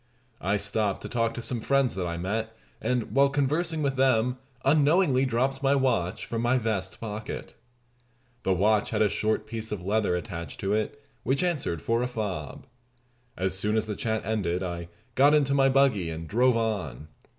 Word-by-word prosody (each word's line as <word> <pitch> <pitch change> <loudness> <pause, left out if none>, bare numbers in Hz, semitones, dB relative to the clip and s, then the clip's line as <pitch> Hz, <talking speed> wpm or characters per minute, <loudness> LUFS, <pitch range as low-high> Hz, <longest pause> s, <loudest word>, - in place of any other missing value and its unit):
I 100 +3 +1
stopped 100 0 0
to - - -4
talk 115 -2 0
to 120 - -5
some 120 -1 -2
friends 140 0 +2
that 90 -2 -2
I 85 0 -3
met, 110 +5 -3 0.2
and 125 -2 -1
while 140 0 +4
conversing 150 +4 0
with 135 -1 0
them 125 -1 +2 0.3
unknowingly 145 -1 +4
dropped 135 +2 0
my 140 0 +3
watch 115 -10 0
from 115 -1 -3
my 120 +2 +3
vest 110 -6 -2
pocket. 110 -1 -6 0.9
The 95 - 0
watch 105 +3 +2
had - - +2
a 105 - +3
short 110 +3 0
piece 110 -1 -5
of 95 -4 -4
leather 105 -2 +1
attached 85 -5 -6
to 100 +1 0
it, 110 +7 -1 0.2
which 135 +5 0
answered 145 - -1
for 115 +1 +1
a 125 - 0
fob. 105 - -5 0.7
As 95 0 0
soon 105 +3 +1
as 110 - +1
the 105 -1 -4
chat 110 +1 -2
ended 95 -4 -1
I 85 -2 -4 0.3
got 145 +4 +5
into 140 -2 +2
my 135 -1 +4
buggy, 130 -10 +3
and 80 0 -6
drove 125 +5 +3
on. 95 - -2
110 Hz, 185 wpm, -27 LUFS, 95-135 Hz, 0.9 s, got